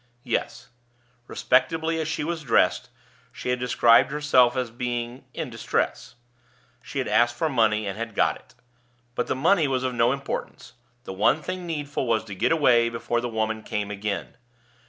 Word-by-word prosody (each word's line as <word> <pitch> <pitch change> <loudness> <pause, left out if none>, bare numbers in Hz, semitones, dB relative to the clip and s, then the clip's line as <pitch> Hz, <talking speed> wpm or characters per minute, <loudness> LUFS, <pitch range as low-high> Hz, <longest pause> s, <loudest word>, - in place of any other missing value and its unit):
Yes; - - -3 0.6
respectably 160 +5 +1
as 155 - -3
she 160 -1 -2
was 165 +1 -3
dressed, 125 -1 +2 0.4
she - - -6
had 125 0 0
described 120 0 +4
herself 135 -5 +3
as 125 -3 -2
being 120 +1 -4
"in 155 -6 -4
distress"; 115 +1 -2 0.8
had - - -2
asked 120 +1 +3
for 155 +6 0
money, 110 -5 +2
and 100 - -4
had 115 -2 -5
got - - +2
it. - - -19 0.6
But 120 - -2
the - - -1
money 160 +3 +3
was 130 -1 -1
of 130 -1 -1
no 120 0 +3
importance; 140 0 -5 0.3
the 95 - -7
one 135 +10 +2
thing 185 -1 -5
needful 145 -4 -3
was 115 -2 +1
to 105 -2 -9
get 95 - 0
away 125 -7 +4
before 120 0 -2
the 120 - -3
woman 110 -1 -2
came 105 -1 -4
again. 100 -2 -4
125 Hz, 170 wpm, -25 LUFS, 115-145 Hz, 0.8 s, described